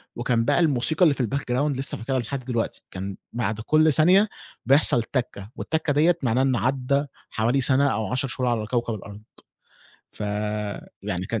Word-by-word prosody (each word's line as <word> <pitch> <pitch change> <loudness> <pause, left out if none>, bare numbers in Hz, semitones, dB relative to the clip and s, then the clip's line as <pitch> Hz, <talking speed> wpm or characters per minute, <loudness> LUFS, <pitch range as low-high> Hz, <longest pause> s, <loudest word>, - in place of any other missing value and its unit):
وكان 120 -1 0
بقى - - +2
الموسيقى 155 0 +2
اللِّي 160 -5 +6
في 135 - -2
الbackground 135 +3 -1
لسّه 135 - -1
فاكرها 130 +4 -2
لحد 130 +2 -5
دلوقتي، 120 -3 -2
كان 95 +1 -6 0.2
بَعد 110 -3 -2
كل 155 +5 +3
ثانية 185 +8 +5 0.4
بيحصل 135 -4 +5
تكة، 115 -5 -4
والتكة 160 -2 -1
ديَّة 165 +4 +3
معناها 125 +1 +2
إنَّه 130 -2 +1
عَدّى 135 +2 0 0.2
حوالي 120 +5 +1
سنة، 140 +2 +3
أو 110 -5 -1
10 130 +2 0
شهور 125 0 -2
على 115 -3 -1
كوكب 120 0 -1
الأرض. 100 0 -10 0.9
فيعني 105 -2 -4
كان 115 +1 -2
125 Hz, 165 wpm, -24 LUFS, 110-140 Hz, 0.9 s, اللِّي